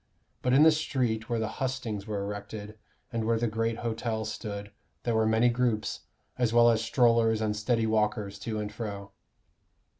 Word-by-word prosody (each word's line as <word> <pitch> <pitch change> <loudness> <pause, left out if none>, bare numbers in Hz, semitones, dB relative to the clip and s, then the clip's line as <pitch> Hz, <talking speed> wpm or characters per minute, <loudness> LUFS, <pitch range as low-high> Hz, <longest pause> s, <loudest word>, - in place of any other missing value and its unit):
But 125 - +1
in 140 +3 +7
the 160 - +8
street 125 -8 -1
where 120 - 0
the 110 -1 -1
hustings 125 -6 -3
were 105 -2 -2
erected, 105 +1 -6 0.4
and 115 -1 -1
where 115 +1 +2
the 120 - 0
great 115 +1 -1
hotels 110 -1 -2
stood, 100 -2 -6 0.3
there 120 - 0
were 110 0 +3
many 110 +2 +4
groups, 120 -3 0 0.4
as 120 -3 +2
well 120 0 +6
as 110 -1 +1
strollers 115 -2 +3
and 105 -1 0
steady 115 +2 +1
walkers 105 -2 0
to 110 +1 -4
and 105 0 -4
fro. 100 -3 -6
110 Hz, 175 wpm, -29 LUFS, 105-120 Hz, 0.4 s, the